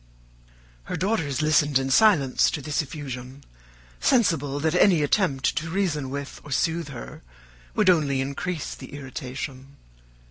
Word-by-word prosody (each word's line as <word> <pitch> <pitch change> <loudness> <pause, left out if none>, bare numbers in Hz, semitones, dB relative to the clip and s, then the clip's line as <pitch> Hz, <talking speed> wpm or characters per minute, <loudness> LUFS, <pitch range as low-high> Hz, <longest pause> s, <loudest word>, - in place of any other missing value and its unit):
Her - - -4
daughters 160 - 0
listened 150 -2 +3
in 135 0 -1
silence 150 -8 +4
to - - -3
this 150 +3 0
effusion, 135 -2 -7 0.6
sensible 155 - +2
that 160 +2 0
any 180 -3 +4
attempt 145 -4 +1
to 165 +1 -2
reason 160 -7 -1
with 140 +1 -6
or - - -12
soothe 165 +2 0
her 125 -4 -9 0.5
would - - +2
only 150 -7 +3
increase 140 +4 -3
the - - -11
irritation. 135 0 -7
145 Hz, 135 wpm, -25 LUFS, 135-165 Hz, 0.6 s, silence